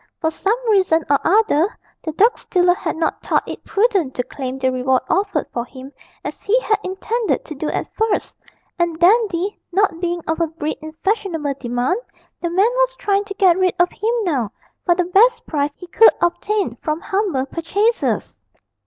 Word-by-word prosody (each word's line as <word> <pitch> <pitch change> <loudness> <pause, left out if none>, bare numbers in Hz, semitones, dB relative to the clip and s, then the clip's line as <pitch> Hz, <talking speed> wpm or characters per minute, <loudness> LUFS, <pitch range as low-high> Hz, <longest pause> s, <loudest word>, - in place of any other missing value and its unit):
For 320 - 0
some 405 +7 0
reason 370 -6 +3
or 280 - +4
other, 405 -2 +2 0.2
the 315 - -4
dog 440 +9 +4
stealer 355 -1 +2
had 355 - -4
not 320 - -1
thought - - 0
it - - -7
prudent 390 - +1
to 250 - -1
claim 260 0 -5
the 260 -1 +1
reward 255 0 +1
offered 395 -6 +1
for 235 - -1
him 260 +2 -11 0.3
as - - -6
he 460 +5 +2
had 425 -3 +1
intended 435 +5 -2
to 310 - -7
do 300 +1 -3
at - - -2
first, 445 0 -1 0.4
and 340 -2 0
Dandy, 390 0 +2
not 380 -2 +1
being 345 -1 -2
of 320 - -1
a 335 - +2
breed 310 -1 -4
in 310 0 -8
fashionable 380 -9 0
demand, 245 - -1 0.4
the 345 - -1
man 390 +7 +3
was - - +2
trying 405 -5 0
to 395 -1 -7
get 375 -3 +4
rid 370 -1 +2
of 350 +1 +3
him 460 +2 -1
now 265 - -1 0.4
for 345 - +5
the 360 0 +1
best 460 +7 +4
price 290 -1 -1
he 360 - -11
could 445 +6 +6
obtain 350 - 0
from 305 +5 -2
humble 380 -9 -1
purchasers. 400 - -1
355 Hz, 185 wpm, -20 LUFS, 310-410 Hz, 0.4 s, could